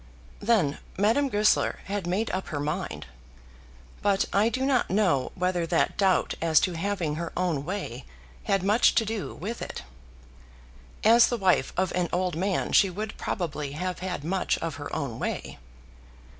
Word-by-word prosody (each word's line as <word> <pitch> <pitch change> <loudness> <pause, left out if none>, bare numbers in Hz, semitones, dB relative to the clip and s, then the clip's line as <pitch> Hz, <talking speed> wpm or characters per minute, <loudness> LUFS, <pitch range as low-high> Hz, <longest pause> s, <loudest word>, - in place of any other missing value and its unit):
Then 200 -10 +2 0.2
Madame 230 +8 +2
Goesler 210 -2 +2
had 200 -2 -3
made 200 +6 0
up 190 +1 -3
her 145 - -3
mind; 150 - -3 1.0
but 200 -1 +2
I 210 +3 +4
do 260 +2 -1
not 270 -3 +2
know 180 -9 +2
whether 180 -2 0
that - - +1
doubt 190 -3 +2
as 160 -2 +5
to 180 - 0
having 170 -3 -2
her 170 - -4
own 175 -6 0
way 165 - -5 0.4
had 195 -3 +1
much 210 +4 +4
to 225 - +3
do 215 -1 -4
with 225 +6 -5
it. - - -6 1.2
As 230 +2 +7
the 240 - -1
wife 185 -9 +2
of 185 0 +1
an 180 -1 0
old 180 -1 0
man 190 +3 -1
she 195 - +5
would 205 +3 -5
probably 150 -5 -3
have 180 +4 -3
had 180 -5 -4
much 185 +3 0
of 165 -5 -4
her 145 - -7
own 125 -5 -3
way. - - -4
185 Hz, 165 wpm, -27 LUFS, 165-205 Hz, 1.2 s, As